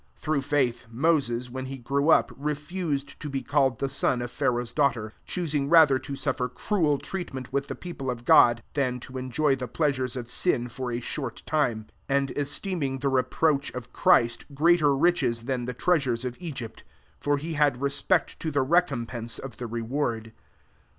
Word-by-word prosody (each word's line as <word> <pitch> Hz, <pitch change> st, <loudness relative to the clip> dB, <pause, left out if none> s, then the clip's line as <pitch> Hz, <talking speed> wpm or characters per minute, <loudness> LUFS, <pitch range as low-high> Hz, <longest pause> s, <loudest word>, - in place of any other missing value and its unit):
\4: -, -, -30 dB
Through 150 Hz, -2 st, 0 dB
faith, 135 Hz, -4 st, 0 dB
Moses, 125 Hz, -2 st, +1 dB
when 130 Hz, +1 st, -5 dB
le 135 Hz, -, -5 dB
grew 140 Hz, +5 st, 0 dB
up, -, -, +5 dB
refused 150 Hz, 0 st, -3 dB
to 150 Hz, -, -5 dB
be 135 Hz, -1 st, -3 dB
called 135 Hz, -4 st, +2 dB
he 135 Hz, -, 0 dB
son 130 Hz, -2 st, 0 dB
of 120 Hz, -, -6 dB
Pharaoh's 120 Hz, -1 st, -1 dB
daughter; 125 Hz, -7 st, +1 dB
)5 -, -, -28 dB
choosing 150 Hz, -5 st, -1 dB
rather 155 Hz, -5 st, +6 dB
to 140 Hz, +2 st, -6 dB
suffer 130 Hz, -3 st, -2 dB, 0.2 s
:ruel 160 Hz, -8 st, +3 dB
treatment 135 Hz, -8 st, -6 dB
with 140 Hz, 0 st, 0 dB
the -, -, -5 dB
peo 175 Hz, -1 st, -7 dB
>le 130 Hz, -, 0 dB
of 120 Hz, -1 st, -7 dB
God, 120 Hz, -1 st, +6 dB
than 130 Hz, -3 st, 0 dB
to 130 Hz, +1 st, -7 dB
enjoy 135 Hz, +3 st, +1 dB
the 125 Hz, -1 st, -5 dB
>leasnres 130 Hz, -2 st, -1 dB
of 120 Hz, -1 st, -6 dB
sin 125 Hz, -8 st, +1 dB
for 125 Hz, 0 st, -4 dB
a 120 Hz, -, -2 dB
short 125 Hz, -1 st, -5 dB
time; 125 Hz, -8 st, 0 dB
^ -, -, -23 dB, 0.2 s
and 140 Hz, 0 st, +1 dB
esteeming 145 Hz, -1 st, -1 dB
the 140 Hz, +1 st, 0 dB
reproach 140 Hz, +3 st, +1 dB
>f 125 Hz, 0 st, -7 dB
Christ* 120 Hz, 0 st, +3 dB
greater 155 Hz, -1 st, +4 dB
riches 135 Hz, -7 st, +2 dB
than 125 Hz, -1 st, -2 dB
he 125 Hz, -, -3 dB
treasures 130 Hz, -5 st, +1 dB
of 125 Hz, -1 st, -3 dB
Egypt: 135 Hz, -10 st, -7 dB, 0.4 s
for 145 Hz, 0 st, +1 dB
he 160 Hz, +3 st, -4 dB
lad 145 Hz, -4 st, +3 dB
respect 140 Hz, 0 st, 0 dB
to 160 Hz, -, -2 dB
the 140 Hz, -3 st, +1 dB
recompense 125 Hz, -8 st, 0 dB
>f 135 Hz, -4 st, -7 dB
the 120 Hz, -, -5 dB
reward. 115 Hz, -1 st, -3 dB
135 Hz, 185 wpm, -26 LUFS, 125-150 Hz, 0.4 s, rather